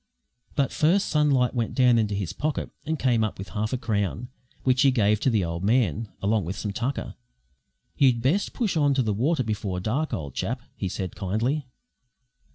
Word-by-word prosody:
But 140 -2 +1
first 180 +6 +2
Sunlight 145 -5 +3
went 120 -3 -2
down 125 -3 +5
into 105 -2 0
his 100 -5 -3
pocket 150 0 -2 0.2
and 160 0 0
came 120 -5 +2
up 110 - -2
with 95 - -7
half 110 0 -2
a 130 - 0
crown, 110 0 -2 0.3
which 130 0 +3
he 140 - +6
gave 105 -5 +3
to 135 - +2
the 105 -7 +2
old 85 +1 -4
man, 110 - +1
along 105 +1 +2
with 90 +4 -4
some 105 -2 -3
tucker. 125 +6 -3 0.8
"You'd 130 -4 +4
best 145 - +1
push 225 -8 -1
on 145 -3 +3
to 130 - +2
the 110 -2 0
water 130 +7 +1
before 105 -4 -2
dark, 130 +11 -1
old 70 -5 -4
chap," - - -3
he 95 - -3
said, 95 0 -4
kindly. 115 +9 -1
115 Hz, 190 wpm, -26 LUFS, 105-135 Hz, 0.8 s, he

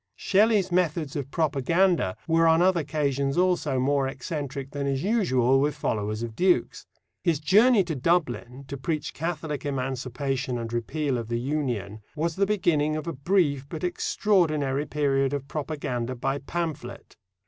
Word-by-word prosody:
Shelley's 205 -2 +2
methods 165 -4 0
of 140 -3 -3
propaganda 160 - +1
were 165 0 +4
on 160 0 +5
other 180 0 +4
occasions 140 -2 -1
also 175 -7 +2
more 135 +1 +1
eccentric 140 0 -5
than 140 -1 -3
is 135 0 -1
usual 135 - +2
with 145 +2 +1
followers 105 +1 -2
of 115 -2 -6
dukes. 180 +6 +1 0.4
His 165 -5 +1
journey 210 +7 +5
to 170 -2 -3
Dublin 135 -4 -1
to 140 - -5
preach 150 +2 -3
Catholic 160 -2 -4
Emancipation 130 -1 -2
and 115 -1 -5
repeal 130 +3 -1
of 115 - -6
the 115 0 -1
Union 120 -7 -3
was, 160 +1 -1
the 195 0 +1
beginning 155 -7 +1
of 155 -1 -4
a 170 - -3
brief 140 -2 +1
but 160 +2 -6
extraordinary 155 -7 +1
period 135 -2 +1
of 140 -1 -3
propaganda 130 -5 -3
by 135 +3 -2
pamphlet. 160 +1 -5
145 Hz, 150 wpm, -26 LUFS, 135-170 Hz, 0.4 s, on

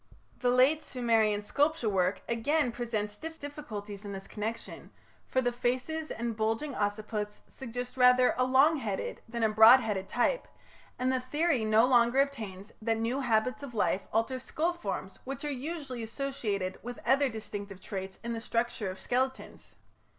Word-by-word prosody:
The 250 - +2
late 260 +5 +4
Sumerian 225 -5 +1
sculpture 290 +2 +1
work 185 -2 +1
again 250 +4 +1
presents 220 -3 -3
difficulties 285 -10 -7
in 200 -1 -6
this 195 0 -7
connection, 220 +2 -5 0.4
for 260 - +1
the 245 -1 +1
faces 255 +6 -2
and 235 0 -3
bulging 225 +6 -1
occiputs 210 -1 -2
suggest 245 0 -7
rather 250 0 +6
a 255 - +2
long 270 +5 +5
headed 210 -8 -3
than 235 0 -2
a 220 - +4
broad 220 +4 +9
headed 205 -5 -3
type, - - +1 0.5
and 255 +1 +1
the 260 - +1
theory 285 0 +1
no 220 +2 +5
longer 245 0 +4
obtains 215 -8 -2
that 225 0 +1
new 230 +4 -1
habits 245 +1 +1
of 270 -4 -8
life 190 -1 +1
alter 225 +4 0
skull 320 +6 -1
forms 195 - -5
which 270 +2 -5
are 295 - -1
usually 275 -2 -5
associated 220 -6 -3
with 245 +1 -7
other 275 +1 +4
distinctive 205 -3 -7
traits 190 0 -6
in 235 0 -3
the 230 - -3
structure 230 -3 -1
of 185 - -7
skeletons. 260 +1 -3
235 Hz, 160 wpm, -30 LUFS, 215-265 Hz, 0.5 s, broad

